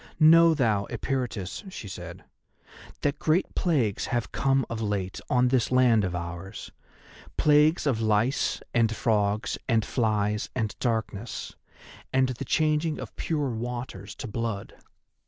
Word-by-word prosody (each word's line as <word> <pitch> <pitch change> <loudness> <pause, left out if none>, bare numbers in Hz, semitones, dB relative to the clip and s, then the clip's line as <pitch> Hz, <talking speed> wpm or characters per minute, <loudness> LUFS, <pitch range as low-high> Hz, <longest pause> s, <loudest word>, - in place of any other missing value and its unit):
"Know 165 +1 +7
thou, 110 -8 +1
Eperitus," 120 -8 -3
she 110 - -7
said, 95 - -8 0.8
"that 145 0 0
great 160 +4 +1
plagues 130 - 0
have 120 -3 -2
come 135 -1 +1
of 115 -1 -4
late 100 -3 -2
on 125 0 +3
this 125 -2 +1
land 125 -4 +4
of 90 -2 -2
ours—plagues 100 - -1
of 125 -6 +1
lice 110 +4 +1
and 115 -2 +2
frogs 105 +1 0
and 110 -2 +2
flies 105 -3 0
and 110 -5 -1
darkness, 110 -2 -3 0.6
and 130 0 +3
the 130 +2 -4
changing 155 +3 +1
of - - -8
pure 150 -5 -1
waters 115 -4 -5
to 130 - -6
blood. 110 -2 -4
115 Hz, 130 wpm, -27 LUFS, 105-135 Hz, 0.8 s, Know